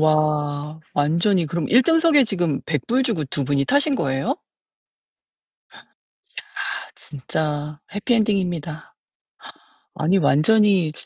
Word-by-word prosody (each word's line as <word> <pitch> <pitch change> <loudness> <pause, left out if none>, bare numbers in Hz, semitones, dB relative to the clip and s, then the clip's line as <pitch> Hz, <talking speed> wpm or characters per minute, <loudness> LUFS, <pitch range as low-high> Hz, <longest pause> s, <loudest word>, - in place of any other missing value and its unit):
와. 150 0 0
완전히 170 +5 +2
그럼 170 0 -3
1 250 +3 +5
등석에 325 -2 +4
지금 175 -9 -1
$100 235 - 0
주고 205 - -1
2 135 +1 -3
분이 140 0 0
타신 285 0 +2
거예요? 135 - -1 2.3
야 - - -5
진짜 150 +1 -4
해피 205 +4 -1
엔딩입니다. 180 -8 -2 1.0
아니 170 +5 +1
완전히 185 +2 +3
160 Hz, 190 characters per minute, -21 LUFS, 150-210 Hz, 2.3 s, 1